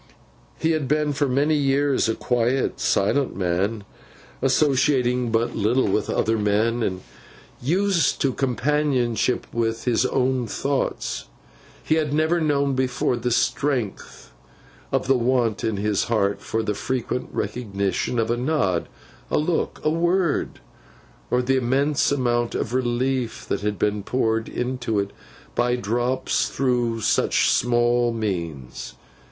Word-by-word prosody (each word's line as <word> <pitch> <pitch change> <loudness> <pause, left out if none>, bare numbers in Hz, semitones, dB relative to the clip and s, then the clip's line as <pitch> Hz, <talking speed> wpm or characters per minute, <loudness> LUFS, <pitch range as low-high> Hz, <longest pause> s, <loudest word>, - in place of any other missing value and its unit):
He 160 - +1
had 155 -4 0
been 150 +1 +1
for 140 0 +1
many 140 +4 +2
years, 140 -3 +2
a 110 - 0
quiet 125 +2 0
silent 130 +7 +1
man, 95 +4 -1 0.6
associating 130 -2 +2
but 115 +1 0
little 115 +5 +2
with 100 +2 0
other 110 0 +1
men, 110 +3 +1
and 95 -4 -2 0.6
used 180 +5 +1
to 135 -2 +2
companionship 130 -2 0
with 115 -1 -1
his 120 -3 +2
own 130 -2 0
thoughts. 140 +5 -2 0.6
He 155 - +2
had 150 -1 -2
never 160 +2 +2
known 140 -3 +1
before 125 -1 0
the 120 +1 -2
strength 115 - -1 0.6
of - - 0
the 135 - +4
want 120 -3 +1
in 110 -2 0
his 105 0 0
heart 100 -4 0
for 110 0 -2
the 105 - -1
frequent 125 +3 -3
recognition 100 -1 -2
of 115 0 +1
a 120 - 0
nod, 120 - 0 0.4
a - - +1
look, 160 +2 -1
a 155 - +2
word; 170 0 0 0.7
or 125 0 +1
the 135 +1 +2
immense 135 +4 +1
amount 120 -3 0
of 120 - -2
relief 125 -1 -1
that - - -1
had 105 0 -1
been 105 0 0
poured 115 0 0
into 125 -3 -2
it 100 0 -1 0.4
by 120 0 +1
drops 120 +3 0
through 120 -3 0
such - - +2
small 120 0 +2
means. 85 - -4
125 Hz, 135 wpm, -23 LUFS, 110-135 Hz, 0.7 s, the